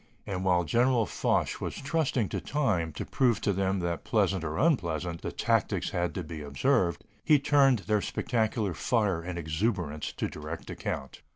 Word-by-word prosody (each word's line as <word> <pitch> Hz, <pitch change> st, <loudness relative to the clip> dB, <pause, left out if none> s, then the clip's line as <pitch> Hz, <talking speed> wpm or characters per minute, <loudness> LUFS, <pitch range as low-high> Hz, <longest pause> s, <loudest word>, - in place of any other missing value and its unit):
And 95 Hz, -3 st, -3 dB
while 90 Hz, -2 st, +3 dB
General 120 Hz, -, +3 dB
Foch -, -, 0 dB
was -, -, -3 dB
trusting 140 Hz, -6 st, 0 dB
to -, -, -3 dB
time 105 Hz, -, 0 dB
to -, -, -5 dB
prove 120 Hz, -6 st, +2 dB
to 100 Hz, -, +1 dB
them 95 Hz, +1 st, 0 dB
that, 85 Hz, -1 st, -2 dB
pleasant 95 Hz, -3 st, +1 dB
or 80 Hz, -1 st, -3 dB
unpleasant, 85 Hz, -, 0 dB
the -, -, -4 dB
tactics -, -, 0 dB
had 90 Hz, 0 st, -1 dB
to 90 Hz, -, -2 dB
be 80 Hz, -1 st, -7 dB
observed, 85 Hz, -, +1 dB, 0.2 s
he 150 Hz, -, +6 dB
turned 140 Hz, -3 st, +4 dB
their 105 Hz, -1 st, +2 dB
spectacular 110 Hz, -4 st, -1 dB
fire 100 Hz, -1 st, +1 dB
and 90 Hz, +1 st, -5 dB
exuberance 80 Hz, -1 st, -2 dB
to -, -, -2 dB
direct 75 Hz, +2 st, -7 dB
account. 70 Hz, -, -5 dB
95 Hz, 170 wpm, -29 LUFS, 85-120 Hz, 0.2 s, he